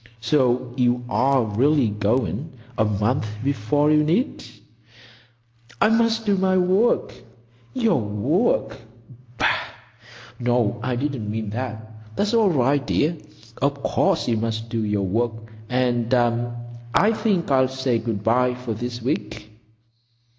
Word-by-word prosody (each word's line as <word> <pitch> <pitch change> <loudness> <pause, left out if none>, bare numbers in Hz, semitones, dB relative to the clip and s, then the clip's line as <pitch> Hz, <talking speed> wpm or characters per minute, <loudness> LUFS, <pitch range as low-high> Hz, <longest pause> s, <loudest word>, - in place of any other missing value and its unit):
So 125 0 +1
you 125 -1 +1
are 130 0 +2
really 125 +4 +2
going,—a 120 +3 -2
month 105 +4 0 0.2
before 140 +3 +1
you 150 0 +4
need?" 180 - 0 1.4
"I - - +4
must 225 0 +2
do 205 -2 +3
my 190 0 +2
work." 185 +6 +2 0.6
"Your 230 - +2
work—bah!... 115 - -2 0.9
No, 120 -3 +1
I 130 0 -1
didn't 125 -5 -3
mean 110 -1 -3
that. 110 -2 -5 0.3
It's 205 +2 0
all 225 -4 +4
right, 140 -2 +2
dear. 155 +4 +1 0.5
Of 140 0 0
course 195 -3 +1
you 115 -2 +1
must 115 0 -3
do 115 -1 -2
your 105 -2 0
work, 115 +4 0 0.3
and—I 120 - 0
think 200 -8 0
I'll 130 -1 +4
say 130 -2 -1
good 110 -3 -4
bye 125 +2 +2
for 125 -2 -5
this 120 +2 -5
week." 110 -4 -3
125 Hz, 120 wpm, -22 LUFS, 115-145 Hz, 1.4 s, you